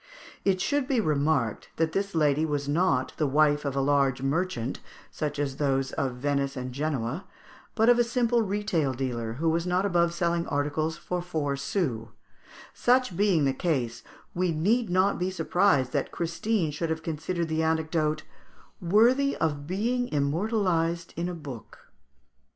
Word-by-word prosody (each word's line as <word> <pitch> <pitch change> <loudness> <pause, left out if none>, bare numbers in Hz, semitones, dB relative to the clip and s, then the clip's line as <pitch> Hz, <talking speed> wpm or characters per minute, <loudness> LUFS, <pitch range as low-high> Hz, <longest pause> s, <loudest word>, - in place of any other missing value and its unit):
It 190 -2 +2
should 285 +7 0
be 265 -4 +1
remarked 145 - 0
that 160 -1 0
this 200 +1 -2
lady 150 -1 +3
was 145 -3 -1
not 145 -4 +1
the 150 - +1
wife 150 +1 +3
of 140 -1 -2
a 135 - +1
large 135 -2 +2
merchant, 135 -4 -1 0.3
such 150 -2 -3
as 140 -2 -2
those 135 -2 0
of 130 -2 -2
Venice 140 +1 -1
and 130 0 -4
Genoa, 145 +3 -2 0.5
but 225 0 +3
of 245 0 +6
a - - +6
simple 240 0 +1
retail 195 -9 0
dealer, 120 -3 -3
who 155 +7 -2
was 165 +2 +1
not 180 +2 +1
above 170 -3 +2
selling 170 0 0
articles 150 +3 -1
for 180 +1 -3
four 155 -5 -2
sous; 140 - -2 0.7
such 250 -5 +2
being 190 -6 +3
the 135 - +2
case, 130 -7 -1 0.3
we 180 0 0
need 205 +8 +1
not 185 +3 +2
be 180 +1 0
surprised 175 -6 +2
that - - -1
Christine 170 +1 -1
should 160 +3 -3
have 160 0 -2
considered 165 +2 -2
the 160 0 0
anecdote 160 -1 0 0.6
"worthy 240 +10 +4
of 145 -3 -1
being 235 +7 0
immortalised 170 +2 0
in 175 +1 -2
a 180 - -4
book." 140 -8 -10
160 Hz, 160 wpm, -27 LUFS, 140-185 Hz, 0.7 s, of